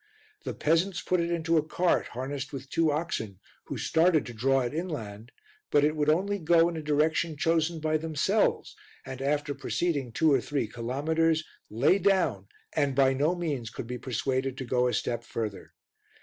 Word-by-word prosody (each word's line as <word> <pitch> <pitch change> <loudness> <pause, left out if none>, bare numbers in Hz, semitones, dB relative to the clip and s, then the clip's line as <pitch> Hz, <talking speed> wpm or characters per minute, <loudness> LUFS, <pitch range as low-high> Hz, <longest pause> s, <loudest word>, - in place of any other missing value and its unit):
The - - -4
peasants 165 +4 +1
put 180 +1 0
it 170 0 0
into 165 -1 +1
a 155 - +3
cart 175 +3 +1
harnessed 135 +3 -5
with 135 0 -8
two 165 -2 +2
oxen 145 - -3 0.3
who - - -5
started 160 -2 +2
to 120 - -8
draw 135 +4 +2
it 125 +2 -3
inland, 120 - -5 0.4
but 145 - +4
would 150 -1 +1
only 200 +6 +1
go 165 0 +4
in 170 - -6
a 160 - -4
direction 155 +1 +1
chosen 165 +1 +1
by 155 0 +1
themselves 155 -2 0 0.3
and, 130 0 -7
after 145 +1 0
proceeding 145 -6 -2
two 155 +7 +3
or 135 - +3
three 140 -5 -2
kilometres, 155 +8 0 0.3
lay 135 - +3
down 175 - +1 0.3
and 145 -3 +1
by 135 -1 +4
no 150 +6 +1
means 145 -10 -3
could 115 - -7
be 125 +1 -5
persuaded 130 +1 -2
to 130 - -5
go 125 0 +2
a 125 - -1
step 120 -1 -2
further. 110 -4 -5
150 Hz, 175 wpm, -28 LUFS, 130-165 Hz, 0.4 s, but